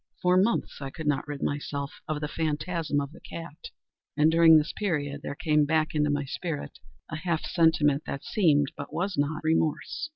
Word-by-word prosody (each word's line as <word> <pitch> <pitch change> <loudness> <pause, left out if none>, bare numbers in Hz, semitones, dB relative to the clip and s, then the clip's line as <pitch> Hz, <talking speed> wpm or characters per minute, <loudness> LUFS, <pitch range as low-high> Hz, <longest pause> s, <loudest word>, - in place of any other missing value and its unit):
For 180 0 +3
months 200 +6 +1
I 135 - -4
could 160 +3 -8
not 145 -1 0
rid 145 -1 -5
myself 145 -1 -3
of 155 -1 -2
the 150 - -1
phantasm 155 0 -1
of 140 0 -4
the - - -14
cat; 170 - -9 0.5
and, 155 +1 +5
during 165 -1 +7
this 155 +1 0
period, 145 -8 -2
there 140 - -5
came 150 -2 +2
back 155 +1 +1
into 150 -1 +1
my 145 -1 0
spirit 150 +2 -5 0.3
a 155 - -3
half 165 -1 -1
sentiment 155 -4 +3
that 140 - -4
seemed, 145 -8 +2
but 145 - -7
was 185 +2 -2
not, 145 +1 -1
remorse. 160 - 0
155 Hz, 190 wpm, -27 LUFS, 145-165 Hz, 0.5 s, during